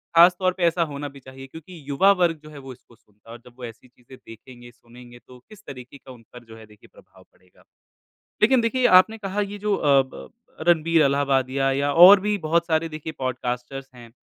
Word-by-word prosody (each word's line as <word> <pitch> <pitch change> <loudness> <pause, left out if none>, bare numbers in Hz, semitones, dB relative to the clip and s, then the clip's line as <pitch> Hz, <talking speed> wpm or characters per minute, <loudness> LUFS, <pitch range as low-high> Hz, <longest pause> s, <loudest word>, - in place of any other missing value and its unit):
ख़ास 175 +2 +6
तौर 185 -1 0
पे 180 - -4
ऐसा 170 0 +1
होना 145 0 -7
भी 140 0 -16
चाहिए 130 0 -13
क्योंकि 160 +5 -14
युवा 145 +8 +3
वर्ग 170 -3 0
जो 155 - -13
है, 150 - -14
वो 135 -2 -11
इसको 120 -1 -23
सुनता 105 0 -27
है - - -10
और 120 - -16
जब 125 - -17
वो 125 - -13
ऐसी 115 +2 -13
चीज़ें 125 +1 -19
देखेंगे, 120 +2 -15
सुनेंगे 120 +1 -17
तो 125 - -16
किस 215 -2 -16
तरीके 125 0 -12
का 135 - -16
उन 125 -2 -15
पर 120 -1 -13
जो 110 -1 -15
है 110 - -14
देखिए 105 -1 -21
प्रभाव - - -21
पड़ेगा? - - -28 0.8
लेकिन 260 -2 +3
देखिए, 250 +2 -1
आपने 185 +5 +4
कहा, 200 -1 -4
ये 205 0 -6
जो 205 0 -2
अ, 140 -6 +2
ब 130 - -11
ब - - -12 0.4
रणबीर 165 -1 +2
अलहाबादिया 135 -1 0
या 140 +1 -1
और 185 +5 +8
भी 210 +2 -2
बहुत 170 -1 -1
सारे 160 0 -1
देखिए 155 0 -8
पॉडकास्टर्स 130 +1 -6
हैं। 120 -1 -14
140 Hz, 225 wpm, -22 LUFS, 125-175 Hz, 0.8 s, और